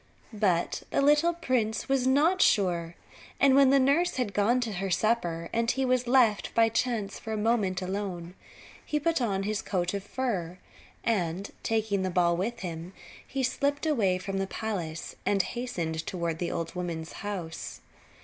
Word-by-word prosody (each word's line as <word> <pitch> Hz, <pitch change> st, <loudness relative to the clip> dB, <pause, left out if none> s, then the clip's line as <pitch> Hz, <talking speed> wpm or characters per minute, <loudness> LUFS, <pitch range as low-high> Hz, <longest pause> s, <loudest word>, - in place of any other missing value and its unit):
But 190 Hz, -5 st, +1 dB
the -, -, 0 dB
little 295 Hz, +4 st, +4 dB
prince 245 Hz, -9 st, -1 dB
was 270 Hz, -2 st, +1 dB
not 315 Hz, +8 st, +3 dB
sure; 175 Hz, -4 st, +2 dB, 0.4 s
and 275 Hz, -1 st, +5 dB
when 275 Hz, 0 st, +6 dB
the 275 Hz, -, +5 dB
nurse 285 Hz, +7 st, +3 dB
had 245 Hz, -6 st, -1 dB
gone 225 Hz, +5 st, +3 dB
to 230 Hz, -3 st, -2 dB
her 195 Hz, +1 st, -3 dB
supper 175 Hz, -4 st, 0 dB
and 230 Hz, 0 st, +1 dB
he 265 Hz, +1 st, +1 dB
was 250 Hz, -1 st, +1 dB
left 240 Hz, -5 st, +3 dB
by 225 Hz, 0 st, +5 dB
chance 225 Hz, -3 st, -1 dB
for 220 Hz, -, -7 dB
a -, -, -1 dB
moment 210 Hz, -4 st, +1 dB
alone, 185 Hz, -2 st, -4 dB, 0.5 s
he 300 Hz, -, -1 dB
put 330 Hz, -1 st, +1 dB
on 195 Hz, -5 st, 0 dB
his 210 Hz, 0 st, -1 dB
coat 180 Hz, -1 st, -1 dB
of 200 Hz, -1 st, -3 dB
fur, 200 Hz, -7 st, -3 dB, 0.5 s
and 190 Hz, -3 st, -1 dB
taking 220 Hz, -3 st, 0 dB
the 190 Hz, -, 0 dB
ball 175 Hz, -1 st, +2 dB
with 230 Hz, +7 st, -3 dB
him 170 Hz, 0 st, -6 dB, 0.3 s
he 270 Hz, -1 st, -2 dB
slipped 285 Hz, +3 st, 0 dB
away 215 Hz, -12 st, +2 dB
from 195 Hz, +1 st, -4 dB
the 195 Hz, -, -1 dB
palace, 175 Hz, -7 st, -4 dB
and 195 Hz, -2 st, +2 dB
hastened 175 Hz, -11 st, -3 dB
toward 170 Hz, -3 st, -2 dB
the 175 Hz, -, -1 dB
old 165 Hz, -1 st, -3 dB
woman's 170 Hz, -3 st, -4 dB
house. 190 Hz, -6 st, -5 dB
205 Hz, 170 wpm, -28 LUFS, 180-250 Hz, 0.5 s, when